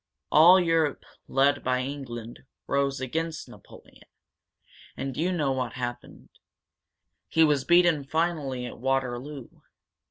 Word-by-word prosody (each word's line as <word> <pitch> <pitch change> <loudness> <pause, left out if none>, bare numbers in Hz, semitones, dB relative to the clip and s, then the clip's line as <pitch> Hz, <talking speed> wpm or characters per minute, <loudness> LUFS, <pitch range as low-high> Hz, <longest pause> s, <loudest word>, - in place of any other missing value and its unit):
All 175 +5 +7
Europe, 165 -4 0 0.2
led 140 +1 +2
by 125 0 0
England, 125 -4 -7 0.3
rose 140 0 0
against 160 +5 -4
Napoleon. - - -17 0.9
And 135 -1 -4
you 175 +4 0
know 150 -6 0
what 130 -1 -2
happened. 120 -1 -7 1.0
He 160 - +3
was 145 -4 +2
beaten 175 -4 +4
finally 150 -5 -2
at 120 - -9
Waterloo. 135 +1 -3
140 Hz, 115 wpm, -26 LUFS, 130-160 Hz, 1.0 s, All